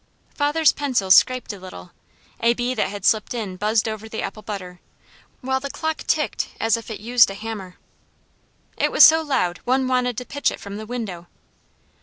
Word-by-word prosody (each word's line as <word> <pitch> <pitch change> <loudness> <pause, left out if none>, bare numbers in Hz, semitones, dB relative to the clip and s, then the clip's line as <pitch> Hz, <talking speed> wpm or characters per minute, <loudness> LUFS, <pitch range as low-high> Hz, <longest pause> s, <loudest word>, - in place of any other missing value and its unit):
Father's 295 +2 +3
pencil 250 -10 -1
scraped 255 +3 +4
a 200 - -10
little, 90 - -11 0.5
a 235 +1 +3
bee 245 +1 -1
that - - 0
had 200 -1 -7
slipped 220 +2 +2
in 210 -6 -4
buzzed 210 +3 +1
over 220 0 -5
the 220 - -4
apple 205 +2 -6
butter, 185 -4 -7 0.6
while 265 +1 -1
the 280 +1 -6
clock 315 +2 -3
ticked - - 0
as 225 +1 +2
if 230 0 -8
it 220 - -6
used 235 +1 +4
a 195 - -6
hammer. 200 -4 -7 1.0
It - - +1
was - - +9
so 320 +1 +6
loud 260 - -1
one 260 +1 +1
wanted 250 -2 0
to 250 - -4
pitch 285 +3 0
it - - -7
from 200 0 -8
the 215 0 -8
window. 205 -8 -6
225 Hz, 190 wpm, -22 LUFS, 200-255 Hz, 1.0 s, was